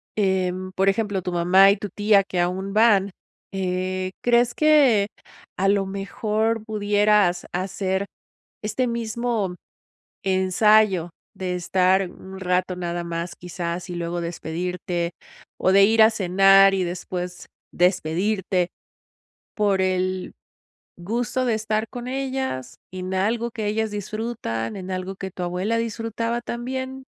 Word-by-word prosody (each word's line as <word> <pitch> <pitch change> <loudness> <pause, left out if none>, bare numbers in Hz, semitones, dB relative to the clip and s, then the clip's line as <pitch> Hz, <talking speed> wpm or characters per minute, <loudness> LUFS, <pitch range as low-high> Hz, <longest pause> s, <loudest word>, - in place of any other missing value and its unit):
Em, 185 -2 0
por 190 +1 0
ejemplo, 200 -1 +1
tu 180 0 -4
mamá 180 +3 +6
y - - +2
tu 205 +1 -6
tía 205 +1 +3
que 185 -2 -4
aún 185 +3 -1
van. 205 -3 +4 0.4
Eh, 185 0 -2
¿crees 240 0 +3
que, 280 -10 +4 0.5
a 195 - +1
lo 200 0 +2
mejor, 215 +3 -1
pudieras 205 -3 +2
hacer 190 +1 -2 0.6
este 230 +4 0
mismo 230 -4 -2 0.7
ensayo 190 -1 +3 0.3
de 185 -1 -3
estar 185 +1 +2
un 190 +1 -11
rato 180 0 0
nada 175 -1 -3
más, 170 +1 -4
quizás, 175 0 -5
y - - -4
luego 175 0 -3
despedirte, 170 +1 -3 0.4
o - - +2
de 195 +1 +7
ir 220 +2 +5
a 220 - +7
cenar 195 -1 +5
y 190 - 0
después 180 0 -5 0.3
despedirte 180 +1 +1 0.9
por 205 -3 +2
el 185 0 -1 0.7
gusto 235 +7 -2
de 235 -3 +2
estar 215 0 -1
con 245 -1 -7
ellas 260 - -3 0.2
en 185 0 -5
algo 225 +5 0
que 220 -2 -4
ellas 220 +1 0
disfrutan, 210 - -4
en 190 -1 -6
algo 185 +1 -4
que 190 0 -6
tu 180 - -8
abuela 180 +6 -1
disfrutaba 230 +1 -2
también? 260 +3 -5
195 Hz, 130 wpm, -23 LUFS, 180-220 Hz, 0.9 s, de